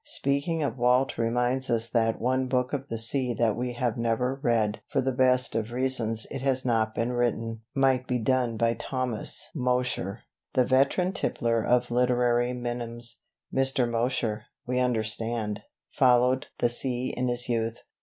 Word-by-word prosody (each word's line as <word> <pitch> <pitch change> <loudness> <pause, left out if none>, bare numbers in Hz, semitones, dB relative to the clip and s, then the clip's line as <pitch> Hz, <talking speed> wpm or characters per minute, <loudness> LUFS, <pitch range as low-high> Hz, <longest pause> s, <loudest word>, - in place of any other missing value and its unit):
Speaking 140 +4 -1
of 135 -3 -3
Walt 125 +1 +2
reminds 125 +3 0
us 115 -1 +1
that 115 -1 +1
one 130 +2 0
book 125 0 0
of 140 -1 -3
the 115 - -4
sea 120 +2 0
that 110 -1 +1
we 125 0 -3
have 120 -2 -1
never 125 +3 0
read 110 -4 +1
(for 140 - 0
the 130 0 0
best 125 -1 +3
of 115 0 -2
reasons: 120 -3 0
it 135 - -5
has 130 -1 0
not 110 -2 +1
been 115 +2 -1
written) 115 -2 -1
might 130 -2 +2
be 125 - 0
done 120 0 0
by 115 +1 +2
Thomas 125 -3 +1
Mosher, 125 - -1 0.3
the 130 -1 +3
veteran 140 +9 +2
tippler 115 -8 0
of 125 0 +1
literary 120 0 +2
minims. 120 -1 -2 0.3
Mr. 135 -2 +2
Mosher, 115 -2 -1 0.2
we 125 +1 -1
understand, 110 -3 -1 0.3
"followed" 125 +1 +3
the 120 - +2
sea 125 +1 -2
in 125 0 -1
his 120 0 0
youth. 115 -1 -1
125 Hz, 160 wpm, -27 LUFS, 115-130 Hz, 0.3 s, best